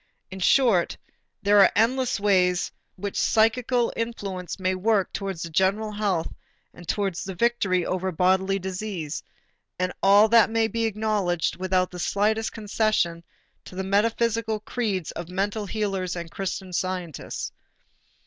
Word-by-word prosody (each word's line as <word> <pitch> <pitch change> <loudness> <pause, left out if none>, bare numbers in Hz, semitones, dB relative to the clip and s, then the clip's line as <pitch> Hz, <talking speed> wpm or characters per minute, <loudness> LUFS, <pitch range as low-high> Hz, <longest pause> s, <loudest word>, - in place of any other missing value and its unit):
In 190 - -7
short, 205 -3 +3 0.5
there 205 +1 +5
are 195 - +7
endless 255 +2 +2
ways 185 -3 +2 0.3
in 185 - -17
which 200 - -2
psychical 235 +2 +2
influence 200 -7 -4
may 185 0 +1
work 195 +1 +1
towards 195 -4 -4
the 170 - -6
general 195 +5 +1
health 200 -6 -1 0.4
and 175 - -13
towards 195 -3 -1
the 190 -1 -6
victory 195 -5 +1
over 185 0 -1
bodily 190 +3 +2
disease; 185 -4 -4 0.6
and 180 0 -1
all 200 +2 +6
that 230 -1 +6
may 225 0 +2
be 230 0 -1
acknowledged 210 -5 0
without 185 0 0
the 180 - -8
slightest 215 +5 0
concession 210 -6 0 0.4
to - - -11
the 190 - -2
metaphysical 225 +2 +1
creeds 210 -7 -2
of 170 0 -7
mental 200 +3 -2
healers 195 -4 -2
and 170 -1 -6
Christian 190 -1 -4
Scientists. 180 -3 -3
195 Hz, 140 wpm, -25 LUFS, 185-220 Hz, 0.6 s, are